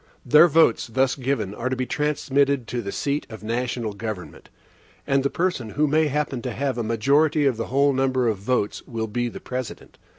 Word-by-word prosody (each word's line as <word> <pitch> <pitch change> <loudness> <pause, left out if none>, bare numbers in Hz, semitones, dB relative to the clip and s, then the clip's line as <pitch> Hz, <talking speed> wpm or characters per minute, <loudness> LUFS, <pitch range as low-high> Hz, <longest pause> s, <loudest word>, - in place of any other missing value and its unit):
Their 150 +7 +7
votes, 160 -6 +3
thus 130 +3 +1
given, 125 -7 -2
are 120 +4 -3
to 130 - -1
be 130 0 -2
transmitted 140 -2 0
to 120 - -2
the 100 -3 -5
seat 145 +1 -2
of 110 -1 -9
the - - -11
national 115 -1 -2
government, 105 -3 -7 0.6
and 135 0 +2
the 140 - 0
person 170 -11 -1
who 150 +8 +1
may 155 +2 +2
happen 145 -3 -2
to 125 -2 -4
have 135 -1 -2
a - - -1
majority 140 +7 +2
of 135 -3 +2
the 115 - -4
whole 140 +2 +3
number 130 -2 +1
of 110 -4 0
votes 105 0 -1
will 115 -2 -3
be 120 +3 -2
the - - -9
President. 125 -2 -7
130 Hz, 205 wpm, -23 LUFS, 115-140 Hz, 0.6 s, Their